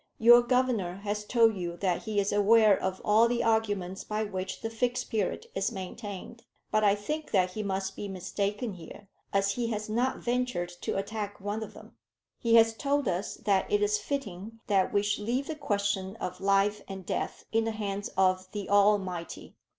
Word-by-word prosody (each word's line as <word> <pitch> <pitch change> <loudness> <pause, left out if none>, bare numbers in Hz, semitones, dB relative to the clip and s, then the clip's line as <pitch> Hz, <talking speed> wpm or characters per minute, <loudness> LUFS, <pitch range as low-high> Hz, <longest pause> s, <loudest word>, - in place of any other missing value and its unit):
"Your 240 +2 +8
Governor 240 -7 +1
has 210 0 -2
told 225 -1 +4
you 175 -2 -4
that 180 0 -1
he 215 -2 0
is 200 0 0
aware 210 0 +5
of 190 0 -3
all 220 +3 +5
the 240 0 0
arguments 205 -5 0
by 215 +1 -2
which 190 -2 -5
the 225 - -3
Fixed 245 +2 -1
Period 215 -5 -1
is 195 +3 -1
maintained; 205 +2 -7 0.3
but 215 - +2
I 200 -1 +5
think 300 +9 -4
that 185 -3 +2
he 215 - -4
must 195 -1 -2
be 205 - -5
mistaken 200 +4 -3
here, 185 +3 -12 0.2
as 200 0 +2
he 235 +3 -2
has 215 -2 -3
not 245 +4 0
ventured 245 -7 -1
to - - -2
attack 205 0 -4
one 205 +2 -3
of 220 - -7
them. - - -14 0.4
He 230 -1 +3
has 225 0 +6
told 280 +3 0
us 185 +2 -2
that 195 -3 +2
it 205 0 +3
is 210 0 +2
fitting 215 -3 -5
that 195 -3 +2
we 200 - +2
should 205 0 -1
leave 250 +5 -1
the 315 - -4
question 200 -7 -1
of 180 -5 -6
life 195 +1 +2
and 190 -2 -7
death - - -3
in 225 0 +2
the - - 0
hands 205 -2 -3
of 185 -1 +2
the 205 -3 -4
Almighty. 200 -4 +1
205 Hz, 190 wpm, -29 LUFS, 195-225 Hz, 0.4 s, Your